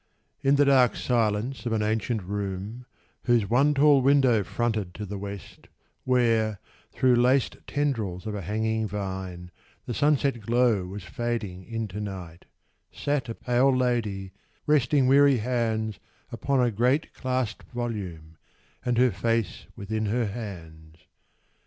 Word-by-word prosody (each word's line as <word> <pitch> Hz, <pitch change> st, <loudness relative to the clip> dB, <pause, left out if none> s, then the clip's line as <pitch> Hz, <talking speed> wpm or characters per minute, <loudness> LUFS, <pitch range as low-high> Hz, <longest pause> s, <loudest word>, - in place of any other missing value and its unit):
In 135 Hz, +1 st, +4 dB
the 145 Hz, 0 st, +4 dB
dark 130 Hz, -3 st, +4 dB
silence 120 Hz, +2 st, 0 dB
of 115 Hz, -, -1 dB
an 110 Hz, -1 st, +1 dB
ancient 110 Hz, 0 st, -1 dB
room, 100 Hz, +5 st, -5 dB, 0.4 s
Whose 120 Hz, -4 st, +3 dB
one 140 Hz, +6 st, +3 dB
tall 140 Hz, -1 st, +5 dB
window 130 Hz, -5 st, +4 dB
fronted 110 Hz, -5 st, -2 dB
to 105 Hz, -, -5 dB
the 100 Hz, 0 st, -6 dB
West, 100 Hz, -1 st, -9 dB, 0.4 s
Where, 115 Hz, -5 st, +2 dB, 0.3 s
through 125 Hz, -2 st, +3 dB
laced 125 Hz, +2 st, +2 dB
tendrils 115 Hz, -11 st, -2 dB
of 110 Hz, -, -3 dB
a 105 Hz, -, -4 dB
hanging 110 Hz, +3 st, -1 dB
vine, 95 Hz, -3 st, -5 dB, 0.3 s
The 120 Hz, -, -4 dB
sunset 140 Hz, -2 st, +2 dB
glow 115 Hz, -4 st, +2 dB
was 100 Hz, +1 st, -7 dB
fading 105 Hz, -2 st, -4 dB
into 110 Hz, -3 st, -4 dB
night, 90 Hz, -5 st, -7 dB, 0.5 s
Sat 145 Hz, -5 st, -2 dB
a 115 Hz, -, -4 dB
pale 130 Hz, +2 st, +2 dB
Lady, 110 Hz, -7 st, -1 dB, 0.3 s
resting 145 Hz, -2 st, +3 dB
weary 140 Hz, 0 st, +5 dB
hands 110 Hz, -2 st, -1 dB, 0.3 s
Upon 140 Hz, -1 st, 0 dB
a 120 Hz, -1 st, +3 dB
great 125 Hz, +8 st, +1 dB
clasped 130 Hz, -4 st, -3 dB
volume, 95 Hz, -10 st, -5 dB, 0.5 s
and 125 Hz, -2 st, 0 dB
her 125 Hz, 0 st, +4 dB
face 115 Hz, +2 st, -1 dB
Within 110 Hz, +2 st, -3 dB
her 115 Hz, +3 st, +1 dB
hands. 85 Hz, -8 st, -8 dB
115 Hz, 135 wpm, -26 LUFS, 100-125 Hz, 0.5 s, tall